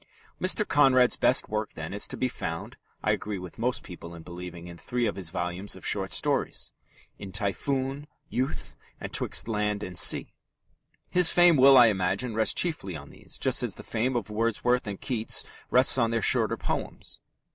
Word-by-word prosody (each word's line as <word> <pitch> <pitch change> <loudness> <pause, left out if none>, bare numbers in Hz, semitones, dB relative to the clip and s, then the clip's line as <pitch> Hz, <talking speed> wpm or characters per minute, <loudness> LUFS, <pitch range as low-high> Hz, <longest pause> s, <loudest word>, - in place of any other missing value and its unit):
Mr. 190 +3 +2
Conrad's 130 -3 +4
best 130 - +2
work, 110 0 -3
then, 80 +4 -6
is 100 - -1
to - - -6
be 130 - +1
found, 80 -8 -6 0.3
I - - +2
agree 105 -1 -2
with 90 +3 -10
most 125 +2 0
people 85 -2 -10
in 85 - -11
believing, 85 -1 -9
in 85 -1 -10
three 120 -1 -2
of 105 - -1
his 95 -4 -5
volumes 90 +3 -4
of - - -12
short 95 -3 -1
stories - - -1 0.5
in 100 - -8
Typhoon, 135 +9 -2 0.2
Youth, 130 +3 -3 0.2
and - - -7
'Twixt - - 0
Land 105 -2 -1
and 90 - -7
Sea. - - +4 0.8
His 180 -2 +5
fame 175 -1 +5
will, 135 0 +7
I 125 - +9
imagine, 100 +3 0
rest 110 0 +1
chiefly 145 - -1
on 70 -2 -10
these, - - -10
just - - +1
as - - -2
the - - -10
fame 125 +4 -1
of 110 -3 -3
Wordsworth 115 +2 0
and 100 -2 -5
Keats 115 -5 -1 0.3
rests 130 +1 +4
on 115 -1 +2
their 115 -2 -1
shorter - - +2
poems. - - -5
110 Hz, 185 wpm, -27 LUFS, 90-125 Hz, 0.8 s, I